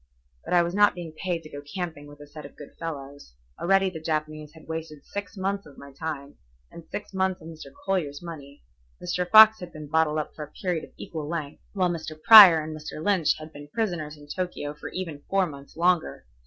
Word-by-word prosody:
But - - -1
I 175 - +5
was 170 +1 -3
not 205 0 +4
being 170 -3 -7
paid 170 0 -3
to 155 - -11
go 145 - -7
camping 160 -1 -6
with 145 0 -14
a - - -10
set 150 +1 -11
of 140 - -12
good 145 - -12
fellows. 145 - -7 0.2
Already 195 +1 +3
the 160 - -7
Japanese 155 -1 -3
had 160 - -16
wasted 160 -2 -6
six 205 +1 -7
months 195 0 -2
of 140 - -16
my 140 - -12
time 145 -2 -6 0.3
and 170 - -11
six 205 - -7
months 190 -1 0
of 160 - -12
Mr. 160 -1 -11
Collier's 160 -7 -1
money, 145 - -10 0.4
Mr. 180 0 -2
Fox 220 +1 +9
had 180 -1 -8
been 155 -1 -9
bottled 155 0 +1
up 155 - -3
for 155 - -7
a 150 - -11
period 175 -4 -1
of - - -22
equal 155 -3 -6
length, 155 -4 -5
while 185 -3 +1
Mr. 160 -2 -6
Prior 185 -5 +10
and 155 0 -6
Mr. 150 0 -8
Lynch 180 -1 +2
had 155 0 -11
been 145 0 -10
prisoners 160 -5 -3
in 145 - -14
Tokio 165 -3 -4
for 150 - -8
even 165 -6 -6
four 195 -1 +3
months 140 -2 -11
longer. 175 - +1
160 Hz, 220 wpm, -26 LUFS, 150-180 Hz, 0.4 s, Prior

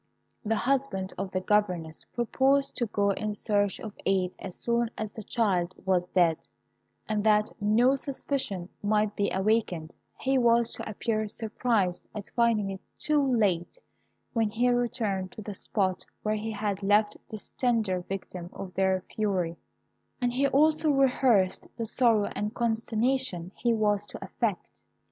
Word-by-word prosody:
The 225 0 +1
husband 245 -7 0
of 195 0 -2
the 185 0 -2
governess 180 -6 0
proposed 270 +4 +2
to 240 - 0
go 200 -1 +1
in 210 +1 -2
search 205 -2 +1
of 215 -2 -7
aid 185 -2 +1
as 190 -2 -6
soon 235 0 0
as 215 -1 -4
the 220 - -7
child 185 -5 0
was 180 -2 +2
dead; 170 -3 +3 0.7
and 215 -1 0
that 210 -1 +3
no 235 +6 +4
suspicion 260 -9 -3
might 210 0 +1
be 200 - +1
awakened, 190 -5 0 0.3
he 265 0 +2
was 235 -1 +4
to - - -5
appear 215 +1 -1
surprised 215 -3 -1
at 205 -2 -6
finding 225 -4 +2
it 190 - -7 0.2
too 300 -1 +2 0.2
late 185 - +1 0.6
when 225 -2 +2
he 240 +3 +2
returned 230 -6 -1
to 215 - -8
the 205 - -5
spot 190 -1 -1 0.2
where 215 - +1
he 215 +1 -3
had 205 -2 -2
left 205 +1 +3
this 215 -2 -7
tender 220 -7 0
victim 180 -1 -6
of 185 -2 -7
their 190 -1 +1
fury, 185 -6 0 0.6
and 245 -1 0
he 275 +3 +2
also 310 +3 +3
rehearsed 255 -8 +3
the 230 - -2
sorrow 225 -2 +3
and 210 +3 -3
consternation 230 -4 0
he 240 - +1
was 210 -2 +1
to - - -7
affect. - - -3
210 Hz, 155 wpm, -28 LUFS, 190-235 Hz, 0.7 s, no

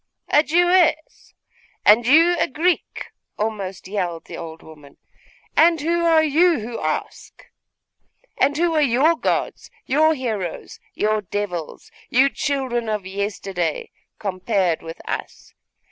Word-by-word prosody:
'A 295 - +5
Jewess? 350 0 +1 0.5
And 225 +3 +5
you 330 +6 +5
a - - +2
Greek?' 335 +5 -2 0.3
almost 200 -4 -4
yelled 180 -4 -3
the - - -9
old 165 -1 -9
woman. 150 -3 -15 0.6
'And 335 0 +5
who 340 +3 0
are 325 -1 +4
you 325 +3 +3
who 230 +2 -6
ask? - - -5 0.9
And 285 +2 +1
who 340 0 +1
are 310 - +2
your 285 +5 +3
gods, - - -2 0.2
your 315 +3 +3
heroes, 220 - -5 0.2
your 215 0 0
devils, 185 -4 -5 0.2
you 265 +3 +4
children 260 -5 -2
of 210 -3 -3
yesterday, 190 -4 -3 0.3
compared 185 -3 -1
with 165 0 -9
us? - - -6
235 Hz, 125 wpm, -21 LUFS, 190-315 Hz, 0.9 s, A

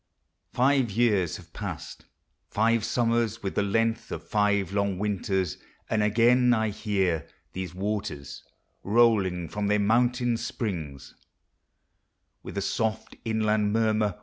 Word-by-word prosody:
Five 130 -1 +2
years 105 -5 +1
have - - -16
past; - - -7 0.4
five 115 +1 +2
summers, 115 -1 0
with 95 - -2
the - - +1
length 115 +3 0
Of - - -6
five 100 -3 +1
long 100 -2 0
winters! 95 -3 -1 0.3
and 110 - +2
again 120 +4 +4
1 110 -3 +2
hear 95 -7 -1 0.3
These 90 -2 -5
waters,* 95 -8 -4 0.4
rolling 100 -6 +2
from 105 +5 -3
their 105 +1 +3
mountain 120 +3 +2
springs 80 - -5 1.3
With - - -8
a 100 - 0
soft 110 +1 -2
inland 110 -2 +1
murmur. 110 -3 +1
105 Hz, 120 wpm, -27 LUFS, 100-115 Hz, 1.3 s, again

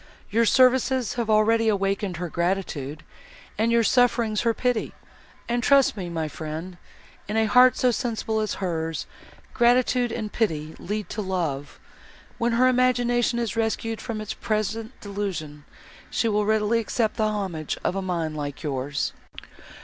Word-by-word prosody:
Your 230 +2 +3
services 255 -1 +3
have 235 -2 -2
already 225 +1 +3
awakened 195 -3 0
her 175 +1 -3
gratitude, 165 -4 -2 0.5
and 225 +2 +1
your 235 0 +4
sufferings 235 -3 +2
her 230 - +2
pity; 250 -3 -1 0.5
and 240 0 0
trust 275 +2 +4
me, 185 -4 -5
my 165 -2 -2
friend, 160 +4 -6 0.5
in 210 +2 -2
a 220 - +3
heart 250 +3 +6
so 250 - +3
sensible 225 -2 -2
as 215 -1 -1
hers, 165 -4 -3 0.5
gratitude 245 0 +3
and 215 -2 -4
pity 160 -8 -1
lead 210 +2 -4
to 215 - -3
love. 165 -8 -3 0.6
When 235 0 +1
her 250 +2 +4
imagination 245 -1 +2
is 230 -3 -2
rescued 225 0 -1
from 220 -2 -4
its 215 - -4
present 220 +2 -3
delusion, 180 -8 -5 0.4
she 230 - 0
will 210 -1 +1
readily 220 +1 +2
accept 225 0 -1
the 215 - +2
homage 190 -8 -3
of - - 0
a 195 - -1
mind 170 -4 -2
like 145 0 -5
yours." 140 -1 -2
215 Hz, 150 wpm, -25 LUFS, 175-235 Hz, 0.6 s, heart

